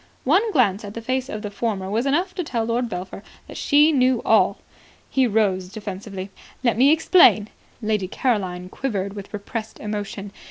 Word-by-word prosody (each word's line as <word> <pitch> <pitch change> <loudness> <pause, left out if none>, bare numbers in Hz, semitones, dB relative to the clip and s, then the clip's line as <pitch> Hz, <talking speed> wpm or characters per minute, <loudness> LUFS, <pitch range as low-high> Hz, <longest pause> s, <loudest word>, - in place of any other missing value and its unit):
One 385 - +3
glance 220 - +2
at 205 0 -8
the 230 - -5
face 255 +2 -1
of 215 +1 -5
the 205 - -5
former 200 -3 -2
was 225 +7 -1
enough 350 +7 +1
to 360 - -3
tell 235 -7 -2
Lord 235 +1 -1
Belpher 185 0 -6 0.3
that - - -10
she 295 +2 +4
knew 255 -4 +3
all. - - +4 0.5
He 265 -2 +3
rose 195 -4 +1
defensively. 200 -2 -7 0.3
"Let 235 -3 +3
me 265 +5 +5
explain." 315 - +5 0.3
Lady 210 -3 0
Caroline 185 -6 -1
quivered 200 -3 -3
with 200 -1 -9
repressed 220 +2 -6
emotion. 205 -1 -5
220 Hz, 170 wpm, -22 LUFS, 200-255 Hz, 0.5 s, me